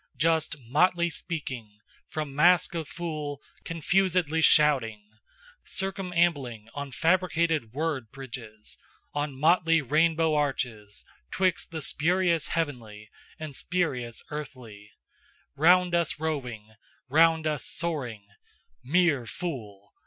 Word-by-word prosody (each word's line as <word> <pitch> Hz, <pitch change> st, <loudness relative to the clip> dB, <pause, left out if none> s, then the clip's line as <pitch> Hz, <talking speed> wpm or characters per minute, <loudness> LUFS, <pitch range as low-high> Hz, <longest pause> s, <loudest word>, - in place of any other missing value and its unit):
Just 160 Hz, -1 st, +1 dB
motley 170 Hz, +8 st, +2 dB
speaking, 130 Hz, -, -5 dB, 0.3 s
From 150 Hz, -3 st, -4 dB
mask 175 Hz, +6 st, +4 dB
of 165 Hz, -3 st, -3 dB
fool 155 Hz, -4 st, -5 dB, 0.2 s
confusedly 165 Hz, -1 st, +1 dB
shouting, 130 Hz, -10 st, +4 dB, 0.6 s
Circumambling 170 Hz, -, -1 dB
on 145 Hz, -1 st, -5 dB
fabricated 165 Hz, -5 st, +1 dB
word 145 Hz, -5 st, -2 dB
bridges, 115 Hz, -5 st, -9 dB, 0.3 s
On 145 Hz, -2 st, -3 dB
motley 165 Hz, +1 st, +4 dB
rainbow 160 Hz, +3 st, +2 dB
arches, 125 Hz, -8 st, -2 dB, 0.2 s
'Twixt 185 Hz, -2 st, 0 dB
the 160 Hz, -2 st, -5 dB
spurious 170 Hz, 0 st, +1 dB
heavenly, 115 Hz, -10 st, -4 dB, 0.3 s
And 155 Hz, -3 st, -7 dB
spurious 130 Hz, -11 st, -2 dB
earthly, 125 Hz, -9 st, -8 dB, 0.7 s
Round 175 Hz, +4 st, +5 dB
us 170 Hz, -3 st, +1 dB
roving, 125 Hz, -9 st, -4 dB, 0.3 s
round 160 Hz, +3 st, +4 dB
us 150 Hz, -5 st, -1 dB
soaring, 130 Hz, -11 st, -3 dB, 0.6 s
MERE 145 Hz, -5 st, +2 dB
FOOL! 110 Hz, -, -6 dB
150 Hz, 100 wpm, -27 LUFS, 125-170 Hz, 0.7 s, Round